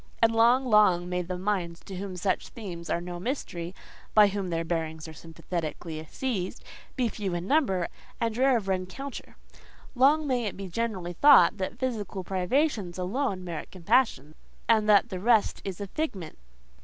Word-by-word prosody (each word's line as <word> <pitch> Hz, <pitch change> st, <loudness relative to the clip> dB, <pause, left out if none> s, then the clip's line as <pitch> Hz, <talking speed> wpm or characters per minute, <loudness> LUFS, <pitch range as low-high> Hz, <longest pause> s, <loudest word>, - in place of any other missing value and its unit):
And 230 Hz, 0 st, +4 dB
long, 240 Hz, +4 st, +5 dB
long 205 Hz, -7 st, +4 dB
may 180 Hz, 0 st, -1 dB
the 180 Hz, +1 st, -4 dB
minds 180 Hz, -3 st, -2 dB
to 190 Hz, -2 st, -8 dB
whom 190 Hz, -1 st, -5 dB
such 185 Hz, +1 st, -1 dB
themes 175 Hz, -7 st, -8 dB
are -, -, +1 dB
no 175 Hz, 0 st, -6 dB
mystery—by 200 Hz, -2 st, 0 dB
whom 195 Hz, -2 st, -3 dB
their 165 Hz, -1 st, -1 dB
bearings 160 Hz, -1 st, -3 dB
are 160 Hz, -, -9 dB
sympathetically 160 Hz, 0 st, -5 dB
seized—be 240 Hz, +2 st, -4 dB
few 195 Hz, -4 st, -3 dB
in 175 Hz, +1 st, -3 dB
number, 195 Hz, -, +2 dB, 0.3 s
and 230 Hz, -1 st, -1 dB
rare 260 Hz, +1 st, +4 dB
of 205 Hz, -4 st, -5 dB
rencounter. 190 Hz, +9 st, -4 dB, 0.6 s
Long 285 Hz, +4 st, +4 dB
may 250 Hz, -4 st, 0 dB
it 205 Hz, -, -4 dB
be 195 Hz, -1 st, -6 dB
generally 185 Hz, -3 st, -3 dB
thought 280 Hz, -, +6 dB
that 190 Hz, -1 st, -4 dB
physical 215 Hz, -7 st, -3 dB
privations 195 Hz, -, 0 dB
alone 190 Hz, +1 st, -2 dB
merit 170 Hz, -3 st, -6 dB
compassion, 185 Hz, -, +1 dB, 0.3 s
and 215 Hz, -2 st, +3 dB
that 205 Hz, -2 st, +5 dB
the 185 Hz, -, -4 dB
rest 225 Hz, +1 st, +2 dB
is 190 Hz, -3 st, -5 dB
a 200 Hz, -, -3 dB
figment. 195 Hz, -, -4 dB
195 Hz, 160 wpm, -27 LUFS, 175-230 Hz, 0.6 s, thought